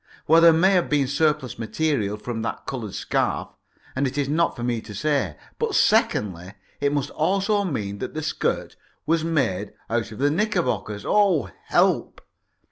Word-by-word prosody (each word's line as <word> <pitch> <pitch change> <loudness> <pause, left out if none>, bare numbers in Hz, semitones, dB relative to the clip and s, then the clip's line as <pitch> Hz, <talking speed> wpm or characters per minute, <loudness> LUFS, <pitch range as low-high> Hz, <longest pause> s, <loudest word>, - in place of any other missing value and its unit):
Well, 165 +2 +6
there 170 0 +8
may 170 +4 +4
have 180 -3 +2
been 145 -2 +2
surplus 140 -2 0
material 115 -4 -1
from 115 +1 -5
that 110 -3 -4
coloured 115 -7 -5
scarf, - - -1 0.5
and 140 +1 +1
it 130 +2 -5
is 140 -2 0
not 165 +4 +1
for 120 - -6
me 120 -2 -1
to 105 -2 -10
say. 135 - 0 0.2
But, - - -1
secondly, 95 -2 +2 0.3
it 140 0 +1
must 145 -2 -1
also 195 +5 +1
mean 100 - -3
that - - -5
the 155 - -3
skirt 155 - -2 0.3
was 160 +1 +1
made 115 - -1 0.2
out 115 -1 -1
of 105 - -9
the 145 +2 +2
knickerbockers. 175 - -1
Oh, 180 - +3
help! - - +1
140 Hz, 170 wpm, -24 LUFS, 110-160 Hz, 0.5 s, there